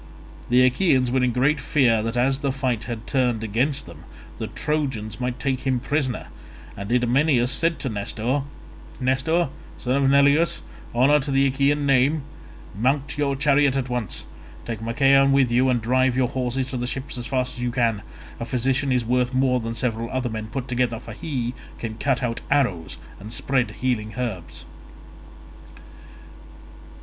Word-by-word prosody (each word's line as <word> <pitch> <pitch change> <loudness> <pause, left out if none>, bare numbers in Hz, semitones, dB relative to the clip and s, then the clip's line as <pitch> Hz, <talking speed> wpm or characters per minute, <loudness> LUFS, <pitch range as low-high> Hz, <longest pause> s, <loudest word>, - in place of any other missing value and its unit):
The 125 +1 +5
Achaeans 130 -2 +2
were 130 0 +2
in 125 - +2
great 135 +5 +2
fear 120 -8 +2
that 115 +2 -3
as 135 +2 +2
the 140 -2 0
fight 130 -4 -2
had 115 -2 -6
turned 125 -4 0
against 130 +7 0
them - - -12 0.4
the - - -3
Trojans 130 -8 -3
might 125 0 -2
take 135 -2 -1
him 130 -2 0
prisoner, 135 -1 -2 0.5
and 100 +3 -6
Idomeneus 125 +1 +3
said 165 +3 +2
to - - -4
Nestor, 110 +5 -1 0.6
"Nestor 135 +6 +1 0.3
son 135 +2 0
of - - +4
Neleus, 140 +4 +4 0.3
honour 140 +5 +5
to 145 +1 -4
the 135 0 +3
Achaean 140 +2 +1
name, 140 +2 +3 0.5
mount 135 +6 0
your 140 -1 +1
chariot 140 -1 +3
at 130 -1 -2
once; 125 -5 -3 0.4
take 115 -2 -5
Machaon 135 +4 +4
with 135 -3 +3
you 125 +2 +3
and 125 -2 +2
drive 130 +2 +1
your 130 -2 +2
horses 130 -1 -1
to 130 - -3
the 125 0 -2
ships 135 +2 -4
as 120 - -4
fast 130 -1 -1
as - - -10
you 125 0 -1
can. 115 -4 0 0.4
A 115 - -3
physician 130 +3 0
is 125 -2 +1
worth 125 +1 +1
more 130 -1 +2
than 115 0 -4
several 115 -1 -1
other 130 -1 -2
men 110 -1 -5
put 125 +3 -5
together, 120 -2 0
for 115 - -9
he 125 -2 -3 0.2
can 110 -1 -6
cut 135 -2 0
out 115 -1 -2
arrows 105 - 0 0.2
and 105 +2 -9
spread 125 +2 +1
healing 110 -4 -2
herbs." 115 -9 -5
125 Hz, 170 wpm, -23 LUFS, 120-135 Hz, 0.6 s, The